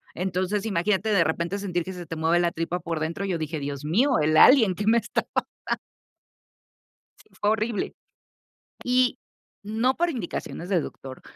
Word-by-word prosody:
Entonces, 185 +3 -1
imagínate, 200 +2 +1
de 195 -5 +4
repente 170 +4 -1
sentir 180 -4 -2
que 190 - -6
se 180 -1 -8
te 165 0 -6
mueve 165 +2 +2
la 170 -1 +2
tripa 165 +2 -3
por 165 -2 -3
dentro, 165 +5 -3
yo 180 -4 -1
dije: 155 0 -3
"Dios 140 0 -5
mío, 235 - +2
el 155 +1 +3
alien", 225 -9 +7
que 205 - -3
me 230 +2 +5
esta - - -2 0.4
pasando - - -3 1.4
Si - - -22
fue 205 - +2
horrible. 220 0 -1 0.9
Y, 250 0 +2 0.5
no 225 +5 +1
por 345 0 +1
indicaciones 180 - -5
de 190 -3 +2
doctor. 135 -3 -9
185 Hz, 170 wpm, -25 LUFS, 165-215 Hz, 1.4 s, alien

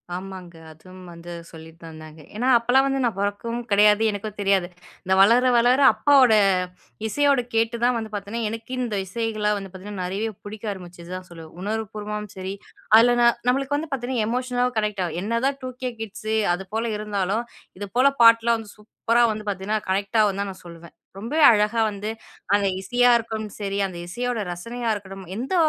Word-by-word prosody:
ஆமாங்க. 185 -1 -8 0.2
அதுவும் 185 +4 -14
வந்து 170 +1 -10 0.2
சொல்லித் 160 0 -13
தந்தாங்க. 155 -1 -11
ஏன்னா 245 +4 -1
அப்போலாம் 245 +3 +3
வந்து 270 0 -1
நான் 230 -5 -1
பொறக்கவும் 215 +4 -2
கிடையாது 210 +1 +5
எனக்கும் 210 0 -6
தெரியாது. 195 -3 +2 0.4
நான் 190 0 +3
வளர 235 +5 +5
வளர 245 +3 +4
அப்பாவோட, 270 -5 +5 0.7
இசையோட 280 +2 +2
கேட்டு 225 +1 +1
தான் 245 0 +3
வந்து 220 -2 -5
பாத்தீங்கன்னா, 210 +3 -3
எனக்கு 225 +2 -8
இந்த 240 -4 -2
இசைகள் 220 +1 -2
வந்து 195 -2 -8
பாத்தீங்கன்னா, 190 0 -7
நெறைய 205 +4 -3
புடிக்க 210 +1 -5
ஆரம்பிச்சு 175 -2 -12
தான் 185 0 -8
சொல்லுவேன். 165 -2 -12
உணர்வு 220 +2 -2
பூர்வமாவும் 210 -1 -5
சரி 190 +1 -4 0.4
அதுல 230 +2 +7
ந - - +5 0.2
நம்மளுக்கு 275 +3 +1
வந்து 315 +1 -5
பாத்தீங்கன்னா 250 -3 -1
எமோஷனல 250 +1 0
கனெக்ட் 210 -2 -2
ஆகும். 165 -1 -5
என்னதான் 230 +6 0
டுகே 255 0 -4
கிட்ஸ் 215 0 -7 0.2
அது 175 +2 -4
போல 225 +1 -1
இருந்தாலும் 210 +1 -2 0.3
இது 205 - -5
போல 255 +2 +6
பாட்டுலாம் 230 0 +6
வந்து 215 -2 -10
சூப்பரா 230 +2 0
வந்து 215 0 -7
பார்த்தீங்கன்னா, 205 +2 -2
கனெக்ட் 200 +3 0
ஆகும் 200 -2 +1
நான் 195 -2 -6
சொல்லுவேன். 170 -1 -12 0.2
ரொம்பவே 235 +11 -2
அழகா 215 +1 +2
வந்து 205 +1 -5 0.4
அந்த 205 0 +3
இசையா 245 +5 +3
இருக்கட்டும் 220 -2 -5
சரி 200 -1 -2
அந்த 185 -2 -6
இசையோட 245 +5 -3
ரசனையா 230 +7 -4
இருக்கட்டும் 195 -2 -8
எந்த 255 - -4
210 Hz, 170 wpm, -23 LUFS, 195-235 Hz, 0.7 s, அதுல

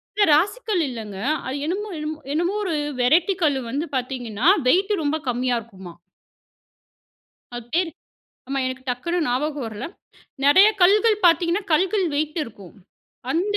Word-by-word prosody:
இல்ல, 415 0 +4
ராசிக்கல் 405 +3 +1
இல்லைங்க. 215 -6 -7 0.3
அது 260 +1 -3
என்னமோ 405 +6 -3
என்னமோ 305 0 -5
என்னமோ 345 +5 0
ஒரு 355 -4 -2 0.3
வெரைட்டி 320 +10 +3
கல்லு 285 -4 +2
வந்து 290 +6 -2
பார்த்தீங்கன்னா, 250 -1 -2 0.2
வெயிட் 390 +8 +3
ரொம்ப 300 +2 0
கம்மியா 245 0 0
இருக்குமா. 190 -6 -12 1.6
அது 240 - -7
பேரு 350 -1 +1 0.6
ஆமா 275 - -2
எனக்கு 260 0 -5
டக்குனு 340 +9 -2
ஞாபகம் 285 +3 -1
வரலை. 220 +8 -6 0.6
நிறைய 375 +9 +7
கல்லுகள் 425 +3 +4
பார்த்தீங்கன்னா 345 +3 +2
கல்லுகள் 375 +3 +2
வெயிட் 305 +3 -1
இருக்கும். 200 -5 -13 0.6
அந்த 405 +5 0
305 Hz, 135 wpm, -22 LUFS, 250-365 Hz, 1.6 s, நிறைய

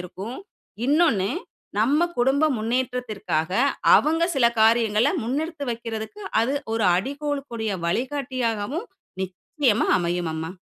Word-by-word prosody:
இருக்கும்". 190 +7 -7 0.5
இன்னொன்னு 280 - +3 0.5
நம்ம 275 +8 +3 0.2
குடும்ப 270 +5 +3
முன்னேற்றத்திற்காக 225 -8 -2 0.4
அவங்க 325 +3 +2
சில 240 -3 +5
காரியங்கள 225 +1 +4 0.2
முன்னெடுத்து 300 +4 -2
வைக்கிறதுக்கு, 230 - -6 0.2
அது 255 - 0 0.2
ஒரு 225 - +1
அடிகோலக்கூடிய 275 -1 -3 0.2
வழிகாட்டியாகவும் 255 - -2 0.4
நிச்சயமா 205 - 0
அமையும் 175 -1 -1
அம்மா. 160 +1 -4
235 Hz, 95 wpm, -24 LUFS, 210-280 Hz, 0.5 s, சில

